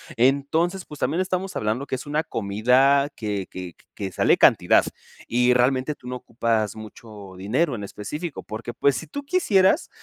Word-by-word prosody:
Entonces, 145 +9 +1
pues, 150 - -11
también 170 - 0
estamos 185 0 -3
hablando 110 +6 -2
que - - -2
es 130 - -7
una 150 +2 -1
comida 125 +7 +2
que 105 -3 -3
que 90 -2 -8 0.2
que 95 -2 -5
sale - - +3
cantidad - - +5 0.4
y 125 +1 +3
realmente 130 +3 +2
tú 125 - -14
no 125 - -4
ocupas 115 -4 -1
mucho 110 -2 -11
dinero 125 - 0
en 105 - -6
específico, 140 - -6
porque, 115 +2 -7
pues, 140 +2 +2
si 160 - -5
tú 285 - -6
quisieras, 255 - +3
125 Hz, 170 wpm, -23 LUFS, 110-150 Hz, 0.4 s, cantidad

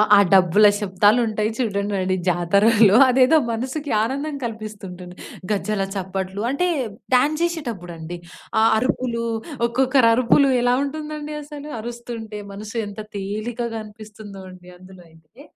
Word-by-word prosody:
ఆ - - +7
డబ్బుల 190 +2 +6
శబ్దాలుంటాయి 210 +2 +2
చూడండండి 200 -5 -1
జాతరలో 200 +5 +4
అదేదో 260 +5 +5
మనసుకి 265 +6 -4
ఆనందం 280 +6 -2
కల్పిస్తుంటుంటుంది. 205 -5 -7 0.4
గజ్జల 210 0 -1
చప్పట్లు. 190 +1 -4
అంటే, 320 +7 0 0.5
డ్యాన్ 285 +5 +3
జేషేటప్పుడండీ. 180 - -4 0.4
ఆ - - +4 0.2
అరుపులు, 235 0 -1 0.4
ఒక్కొక్కరరుపులు 255 +1 +3
ఎలా 245 0 +3
ఉంటుందండి 300 +1 -5
అసలు 295 0 -9
అరుస్తుంటే, 230 -2 -7
మనసు 210 +3 -9
ఎంత 205 +1 -9 0.2
తేలికగా 225 +4 -4
అనిపిస్తుందో 210 -2 -12
అండి 180 -1 -14
అందులో 185 0 -15
అయితే. 160 - -20
215 Hz, 110 wpm, -21 LUFS, 195-255 Hz, 0.5 s, ఆ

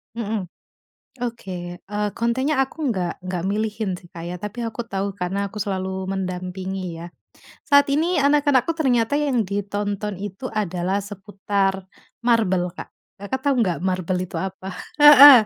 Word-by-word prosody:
Mhm, 220 -4 -2 0.8
oke. 230 -5 -8 0.4
Eee, 210 0 0
kontennya 260 +6 +1
aku 265 - -10
nggak 185 -7 -1
nggak 180 -2 -3
milihin 215 -1 -1
sih, 175 - -17
Kak, 170 -2 -9
ya. 180 - -4
Tapi 210 +5 -5
aku 235 +2 -4
tahu, 195 0 -2
karena 180 +2 -1
aku 210 - -7
selalu 190 -1 -2
mendampingi 185 0 -3 0.2
ya. - - -5 0.6
Saat 285 0 +5
ini 315 +3 +2
anak-anakku 285 0 +3
ternyata 260 -2 +2
yang 275 -6 +1
ditonton 205 0 -2
itu 205 +5 -6
adalah 190 -1 -1
seputar 200 0 -1 0.5
MarBel, 215 -7 +3
Kak. - - -7 0.3
Kakak 260 +6 -2
tahu 280 -1 +2
enggak 180 -7 +1
MarBel 185 -1 0
itu 185 - -6
apa? 190 0 -4 0.3
Heeh. 285 -5 +11
205 Hz, 145 wpm, -23 LUFS, 190-240 Hz, 0.8 s, Heeh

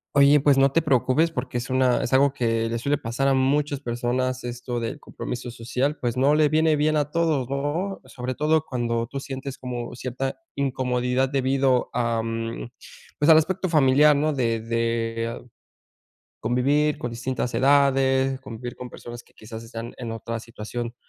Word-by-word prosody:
Oye, 140 +1 +6
pues, 140 -2 +4
no 135 0 +4
te 165 - +3
preocupes, 150 +3 +2
porque 125 -3 -4
es 125 +2 -4
una 130 -2 +2
es - - -3
algo 135 +1 +4
que 115 -3 0
le 115 +1 -2
suele 140 +4 0
pasar 130 +4 -1
a - - +3
muchas 140 +2 +1
personas. 125 0 -2
Esto 120 0 -4
del 115 - -4
compromiso 125 0 -6
social, 125 +5 -2
pues, 120 0 -1
no 140 +3 +4
le 155 -1 +4
viene 155 0 +3
bien 155 +1 +2
a 145 0 -1
todos, 155 -7 0
no, 150 +8 -2
sobre 130 -1 -5
todo 155 +1 +2
cuando 115 -2 -1
tú 135 +1 -5
sientes 135 0 -6
como 125 -2 -5
cierta 130 +2 -4 0.2
incomodidad 130 -1 0
debido, 135 -1 +1
am, 115 -1 -2
a, 120 - -13 0.5
pues 150 +2 +3
al 155 - +8
aspecto 185 +3 0
familiar, 150 -1 +5
no 155 +1 +1
de 115 -4 0
de 115 0 -2 0.9
convivir 145 +4 +1
con 120 - -4
distintas 125 +1 -3
edades, 135 -1 +3
convivir 120 -1 -7
con 125 -1 -8
personas 120 0 -9
que - - -28
quizás 110 +1 -10
están 115 0 -7
en 115 -2 -5
otra 115 0 -5
situación 115 +1 -6
130 Hz, 170 wpm, -24 LUFS, 120-140 Hz, 0.9 s, al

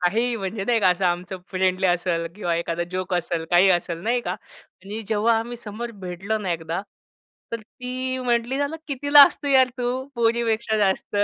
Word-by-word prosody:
काहीही 230 +7 +1
म्हणजे 195 -1 -4
नाही 235 0 +2
का, 190 - +5
असं 180 +1 0
आमचं 180 +1 -1
फ्रेंडली 185 0 +1
असेल, 175 -1 0
किंवा 175 -5 -1
एखादा 170 0 -2
जोक 185 0 -2
असेल, 170 -1 -1
काही 180 +2 +6
असेल, 175 -1 0
नाही 240 +3 +1
का, - - -3 0.5
आणि 210 +3 -5
जेव्हा 225 +1 +2
आम्ही 240 +2 -5
समोर 235 +1 -6
भेटलो 190 +5 -3
ना, 190 -4 -2
एकदा 165 +2 -3 0.7
तर 230 - -3
ती 255 +3 -5
म्हटली 245 +1 0
मला 285 +2 -1
किती 285 +1 -4
लाजतो 285 0 +7
यार 265 -2 +6
तू 245 - -2 0.3
पोरीपेक्षा 230 -1 +1
जास्त. 195 0 0
215 Hz, 175 wpm, -23 LUFS, 180-240 Hz, 0.7 s, लाजतो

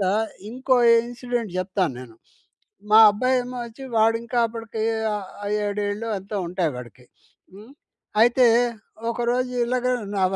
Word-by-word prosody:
తర‌వాత 190 - +1 0.4
ఇంకో 260 +2 +1 0.3
ఇన్సిడెంట్ 245 -4 -4
జెప్తా 185 +1 0
నేను. 120 -3 -12 0.7
మా 215 - +8
అబ్బాయేమో 250 +3 -1
వొచ్చి, 235 +3 -11
వా‌డింకా 230 +2 +1
అప్పడికీ 225 -1 -6 0.3
ఆహ్, 200 -3 -6 0.4
ఏడేళ్ళో 205 +2 -3
ఎంతో 200 +2 -7
ఉంటాయి 175 -2 -1
వాడికి. 125 0 -11 0.5
హ్మ్. 215 +7 -14 0.5
అయితే, 245 +1 +5 0.6
ఒకరోజు 245 +2 -1
ఇలాగ 250 +1 -1 0.3
నా 190 - +2
225 Hz, 115 wpm, -23 LUFS, 200-245 Hz, 0.7 s, మా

